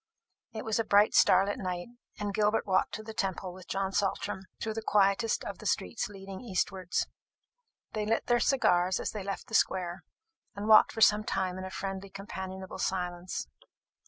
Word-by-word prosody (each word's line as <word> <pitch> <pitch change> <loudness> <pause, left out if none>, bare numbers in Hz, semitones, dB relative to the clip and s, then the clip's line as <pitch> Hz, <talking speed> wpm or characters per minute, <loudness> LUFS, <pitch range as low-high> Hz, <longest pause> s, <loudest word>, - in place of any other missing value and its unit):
It 220 - -6
was 220 0 0
a - - +2
bright 205 0 +4
starlight 195 +2 +4
night, 180 0 -4 0.3
and 205 -1 -3
Gilbert 215 +1 +2
walked 190 -2 +1
to 215 - -7
the 220 0 -8
Temple 190 -3 -2
with 185 -1 -12
John 195 0 -1
Saltram, 195 -1 -1
through 220 - -2
the 225 - -4
quietest 210 +1 +2
of 200 - -6
the 215 - -5
streets 225 - -1
leading 195 -1 -9
east 200 -5 0
wards. 185 -2 -1 0.9
They 210 -1 -2
lit 225 +1 +1
their 240 -1 +3
cigars 185 -10 +3
as - - -2
they 210 - -5
left 195 0 -4
the - - -15
square, 180 -4 +1 0.5
and 205 +1 -4
walked 215 -1 +7
for 225 - -5
some 210 0 +6
time 185 -3 -1
in 185 - -5
a - - -5
friendly 195 +1 -5
companionable 190 -1 -7
silence. 180 - -2
195 Hz, 185 wpm, -30 LUFS, 185-215 Hz, 0.9 s, walked